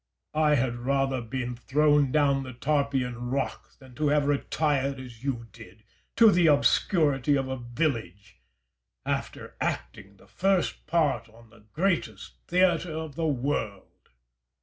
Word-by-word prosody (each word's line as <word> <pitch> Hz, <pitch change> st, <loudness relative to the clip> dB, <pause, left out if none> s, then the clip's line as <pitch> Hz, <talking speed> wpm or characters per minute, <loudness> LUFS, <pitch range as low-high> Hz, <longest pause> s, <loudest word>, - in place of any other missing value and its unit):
Caesar. 155 Hz, +1 st, +1 dB
I 150 Hz, -1 st, +4 dB
had 125 Hz, -2 st, 0 dB
rather 135 Hz, +2 st, 0 dB
have 115 Hz, -3 st, -7 dB
been 125 Hz, -1 st, -3 dB
thrown 145 Hz, +2 st, +2 dB
down 140 Hz, -2 st, +2 dB
the 130 Hz, -1 st, -8 dB
Tarpeian 130 Hz, -3 st, -1 dB
Rock 135 Hz, +1 st, -4 dB
than 130 Hz, -2 st, -16 dB
have 145 Hz, 0 st, +2 dB
retired, 140 Hz, -1 st, 0 dB
as 125 Hz, -2 st, -11 dB
you 125 Hz, -4 st, -3 dB
did, 110 Hz, -1 st, -15 dB, 0.3 s
to 225 Hz, -2 st, +7 dB
the 175 Hz, -3 st, +4 dB
obscurity 145 Hz, -1 st, +3 dB
of 135 Hz, -1 st, -1 dB
a 130 Hz, 0 st, -3 dB
village, 120 Hz, -, -4 dB, 0.6 s
after -, -, -4 dB
acting 95 Hz, +12 st, -4 dB
the -, -, -20 dB
first 190 Hz, -4 st, -1 dB
part 150 Hz, -8 st, +1 dB
on 115 Hz, 0 st, -19 dB
the 115 Hz, -3 st, -20 dB
greatest 185 Hz, 0 st, -1 dB
theatre 175 Hz, -2 st, +2 dB
of 160 Hz, -2 st, -5 dB
the 160 Hz, +3 st, -1 dB
world. 130 Hz, -7 st, -3 dB
135 Hz, 145 wpm, -27 LUFS, 120-150 Hz, 0.6 s, to